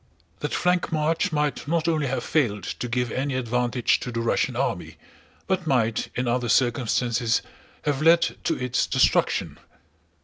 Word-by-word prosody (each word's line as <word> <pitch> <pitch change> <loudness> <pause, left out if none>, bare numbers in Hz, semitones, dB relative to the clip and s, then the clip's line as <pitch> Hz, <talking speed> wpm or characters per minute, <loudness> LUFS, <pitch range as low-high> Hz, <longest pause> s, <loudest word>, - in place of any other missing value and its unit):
That 150 - -3
flank 180 0 +1
march 160 +5 0
might 150 -1 -1
not 165 +1 0
only 155 -4 +1
have 130 - -2
failed 105 - 0
to 125 - -4
give 125 0 -1
any 135 +1 -2
advantage 125 0 +1
to 125 - -5
the 115 - -3
Russian 115 - 0
army, - - -2 0.5
but 185 -3 -1
might 115 -5 +1
in 125 0 -1
other 120 0 0
circumstances 120 -1 +1 0.4
have 145 -1 -1
led 165 +2 +6 0.2
to - - +1
its 125 0 -1
destruction. - - +1
130 Hz, 150 wpm, -24 LUFS, 120-155 Hz, 0.5 s, led